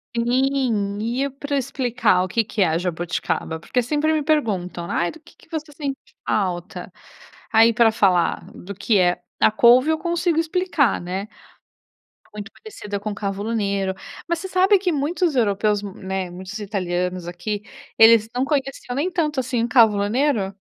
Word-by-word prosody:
Sim 235 -4 0
e 240 +5 -1
eu 280 - -2
pra 285 +1 -3
explicar 245 -7 +1
o - - -3
quê 225 +5 +1
que 210 0 -3
é 165 -3 +3
jabuticaba? 175 -2 -3
Porque 250 +8 -1
sempre 300 +5 0
me 310 - +1
perguntam: 195 - -1
"Ai, 175 - 0
do 320 - -14
que - - -20
que - - -23
você 315 -2 -5
sente 280 -2 -4 0.3
falta?" 180 -2 -2 0.6
Aí, 225 +1 +5
pra 225 0 +4
falar 185 -5 +2
do 200 +3 -9
que 205 +2 +1
é 180 -1 +2 0.2
a - - +5
couve 245 +6 +5
eu 315 - +2
consigo 345 -1 0
explicar, 330 - +1
né? 185 +3 -4 1.1
Muito 210 0 -8
parecida 210 - -7
com 210 +1 -4
cavolo 200 +2 -3
nero. 200 -3 0 0.4
Mas 340 0 0
você 380 - -6
sabe 380 +2 +4
que 365 -2 -1
muitos 310 +2 0
europeus, 210 -3 +1
né, 190 -2 -5
muitos 185 +4 -8
italianos 180 -3 -2
aqui 180 +4 -4 0.4
eles 225 -1 +7
não 250 +1 0
conheciam 275 -3 -2
nem 300 +8 -1
tanto 305 -5 0
assim 245 -2 -1
o - - -2
cavolo 220 -5 +4
nero? 225 -5 0
225 Hz, 165 wpm, -22 LUFS, 195-280 Hz, 1.1 s, eles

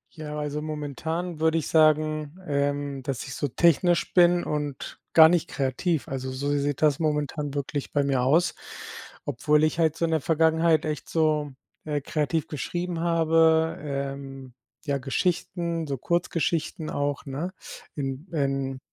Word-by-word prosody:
Ja, 150 -1 -6
also, 150 0 -3
momentan 155 +3 -4
würde 160 0 +2
ich 160 - -2
sagen, 155 0 +2
ähm, 140 -2 -1
dass 130 -2 -3
ich 130 - -7
so 145 - -2
technisch 170 +5 +2
bin 175 -1 +5
und 145 -2 -4
gar 160 -1 +9
nicht 170 -1 +1
kreativ. 140 +4 -1
Also, 130 -1 -4
so 140 +2 -3
sieht 145 +1 -1
das 150 -1 +4
momentan 150 -2 -1
wirklich 145 0 -3
bei 145 -1 +2
mir 135 -2 +1
aus. 155 +8 +3 0.7
Obwohl 150 +6 +2
ich 155 +1 +1
halt 160 -2 +3
so 165 - 0
in 165 - -1
der 160 -3 +1
Vergangenheit 160 0 +3
echt 150 -2 -4
so, 155 -3 +1 0.3
äh, 150 -1 -1
kreativ 150 +2 -1
geschrieben 175 +3 -3
habe, 160 -1 +3
ähm, 140 -2 -5 0.3
ja 140 -2 0
Geschichten, 170 +3 -1
so 135 - -2
Kurzgeschichten 165 0 -1
auch, 145 0 -2
ne, 150 +6 -4 0.4
in 135 +3 -4
in 135 -2 -1
150 Hz, 150 wpm, -26 LUFS, 140-165 Hz, 0.7 s, gar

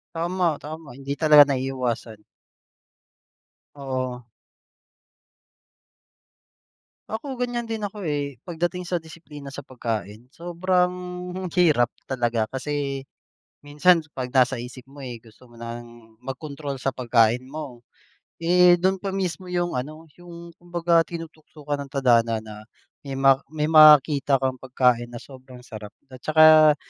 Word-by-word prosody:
Tama, 170 -1 0
tama. 155 -3 -9
Hindi 135 +1 -7
talaga 150 -2 +8
naiiwasan. 130 -4 -3 1.6
Oo. 130 -3 -4 2.8
Ako, 255 +4 -5
ganiyan 240 -2 -3
din 220 -2 -3
ako, 205 +1 -7
eh, 145 - -3
pagdating 175 +2 -3
sa 175 0 -2
disiplina 155 -4 -11
sa 140 - -6
pagkain. 115 -4 -5
Sobrang 180 +1 0 0.6
hirap 150 -9 +3 0.2
talaga, 120 -4 -1
kasi 140 0 -3 0.6
minsan 160 +4 +3
kapag 130 -5 -7
nasa 130 0 +3
isip 125 +2 -8
mo, 145 - -15
eh, 125 -4 -8
gusto 115 +2 -19
mo 120 - -20
nang 115 -1 -10
magkontrol 140 +1 -7
sa 135 - +1
pagkain 120 0 +2
mo. 135 -5 -9 0.5
Eh, 175 +1 +5
do'n 190 +2 0
pa 195 - -4
mismo 185 -1 -3
yung 175 -1 -1
ano, 155 +6 -5 0.2
yung 170 -1 -11
kumbaga 175 -1 +1
tinutukukan 155 -3 -6
ng 140 - -7
tadhana 115 -5 +2
na 110 -1 -9 0.5
may 135 -2 -7
ma 135 0 +4
may 150 0 -3
makita 150 -3 +6
kang 130 -1 -2
pagkain 125 -2 +1
na 120 - -10
sobrang 130 0 -13
sarap 105 -1 -9 0.2
at 130 - -11
saka 155 0 +6
140 Hz, 125 wpm, -24 LUFS, 125-165 Hz, 2.8 s, talaga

